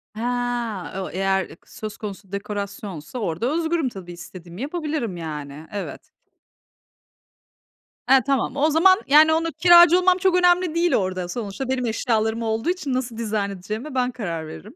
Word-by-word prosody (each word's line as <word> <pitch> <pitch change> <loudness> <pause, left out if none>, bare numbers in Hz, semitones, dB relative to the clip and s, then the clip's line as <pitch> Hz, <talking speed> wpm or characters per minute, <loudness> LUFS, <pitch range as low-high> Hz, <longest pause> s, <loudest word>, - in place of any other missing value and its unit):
He, 220 - -6 0.8
o 185 - -5
eğer 190 +1 0
i 165 - -13
söz 215 -1 -8
konusu 200 -2 -8
dekorasyonsa 200 -1 -5
orada 220 - -1
özgürüm 325 -4 0
tabii 185 -5 -10
istediğimi 175 +2 -10
yapabilirim 295 - -3
yani. 150 -2 -7
Evet. 205 -1 -5 2.1
He, 265 0 +7
tamam. 270 -2 0
O 290 +2 +2
zaman 375 +6 +5
yani 310 +3 +6
onu 330 +1 0
kiracı 345 +2 +7
olmam 365 0 +4
çok 375 -1 +2
önemli 360 -2 +3
değil 340 0 +2
orada. 185 -2 -1
Sonuçta 225 +5 -5
benim 255 -2 0
eşyalarım 225 -1 0
olduğu 225 +6 -1
için 355 -7 -2
nasıl 250 -3 -3
dizayn 215 -3 -1
edeceğime 215 +9 -6
ben 250 -1 +1
karar 170 -10 -5
veririm. 80 - -11
230 Hz, 150 wpm, -23 LUFS, 195-310 Hz, 2.1 s, He